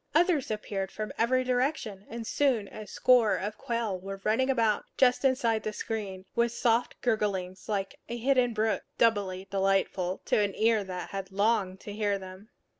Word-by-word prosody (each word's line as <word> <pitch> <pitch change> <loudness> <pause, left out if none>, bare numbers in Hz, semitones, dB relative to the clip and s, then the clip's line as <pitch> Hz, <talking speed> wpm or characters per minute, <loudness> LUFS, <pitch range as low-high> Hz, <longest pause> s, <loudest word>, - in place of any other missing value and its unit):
Others 335 -4 +3
appeared 205 -3 -3
from 215 0 -5
every 255 +3 +2
direction, 250 -6 -1
and 230 0 -6
soon 245 -6 +1
a 215 -1 -9
score 245 -2 +4
of 210 +2 -4
quail 230 -7 -2
were 195 +1 -7
running 245 +5 +2
about, 230 -5 +2
just 250 0 +4
inside 245 -5 +2
the 215 - -3
screen, 200 -5 -4
with 235 0 +2
soft 235 0 +1
gurglings 200 -6 -1
like 195 -2 -2
a 235 - -3
hidden 250 0 +2
brook, 220 -3 0 0.2
doubly 195 -4 +1
delightful 195 -1 +1
to - - +2
an 205 -2 0
ear 220 -1 +3
that 185 -2 -6
had 195 -1 -5
longed 195 -2 +1
to 205 - -7
hear 205 -1 0
them. 190 +2 -11
215 Hz, 170 wpm, -29 LUFS, 195-235 Hz, 0.2 s, score